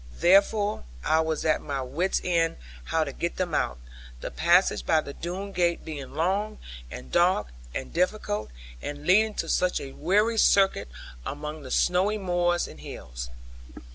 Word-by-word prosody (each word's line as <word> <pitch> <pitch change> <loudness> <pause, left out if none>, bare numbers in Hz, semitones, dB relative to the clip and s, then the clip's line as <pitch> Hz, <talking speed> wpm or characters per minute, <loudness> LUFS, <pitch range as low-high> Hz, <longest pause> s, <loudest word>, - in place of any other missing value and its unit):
Therefore 205 +3 +4 0.2
I 160 - +3
was 160 -1 -1
at 155 -1 +2
my 140 -2 -3
wit's 165 +9 0
end 170 -2 +1 0.3
how 160 -1 +1
to 140 - -4
get 170 - -3
them 180 -3 -2
out; 65 - 0 0.4
the - - -5
passage 175 +2 +3
by 160 - +3
the 140 - -8
Doone 185 +6 -5
gate 175 -2 0
being 145 -4 -7
long, 195 +6 0 0.3
and 65 +1 -9
dark, 175 - +3 0.3
and 130 - -4
difficult, 175 - 0 0.3
and 145 0 -6
leading 215 +4 +4
to - - -2
such 180 0 +1
a 135 - -7
weary 210 +10 +2
circuit 195 - +4 0.4
among 150 - -5
the 130 - -9
snowy 185 +9 +2
moors 175 -3 +1
and - - -12
hills. - - -7
175 Hz, 160 wpm, -27 LUFS, 150-190 Hz, 0.4 s, Therefore